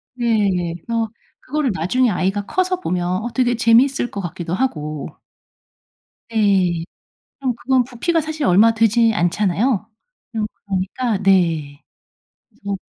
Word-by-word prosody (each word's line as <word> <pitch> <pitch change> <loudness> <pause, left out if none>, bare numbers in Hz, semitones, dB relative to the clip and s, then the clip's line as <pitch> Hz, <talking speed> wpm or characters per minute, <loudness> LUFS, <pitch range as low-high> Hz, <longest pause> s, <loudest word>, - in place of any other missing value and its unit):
네. 200 -8 0
그래서 230 -1 -1 0.3
그거를 290 -2 -1
나중에 210 +9 +1
아이가 195 +1 -1
커서 370 - 0
보면 180 - -1
어 240 - -3
되게 245 -2 +2
재밌을 240 +2 +3
것 200 - -4
같기도 175 -1 -5
하고. 155 - -2 1.2
네. 195 -6 +2 0.6
그럼 260 -3 -1
그건 255 +1 +1
부피가 270 +8 -1
사실 310 0 -3
얼마 210 +6 +5
되지 225 +1 +3
않잖아요. 205 +5 0 0.5
음 215 -1 0 0.2
그러니까 200 +4 -1
네. 165 -7 +2 0.7
그래서 200 -3 -5
215 Hz, 260 characters per minute, -20 LUFS, 185-245 Hz, 1.2 s, 얼마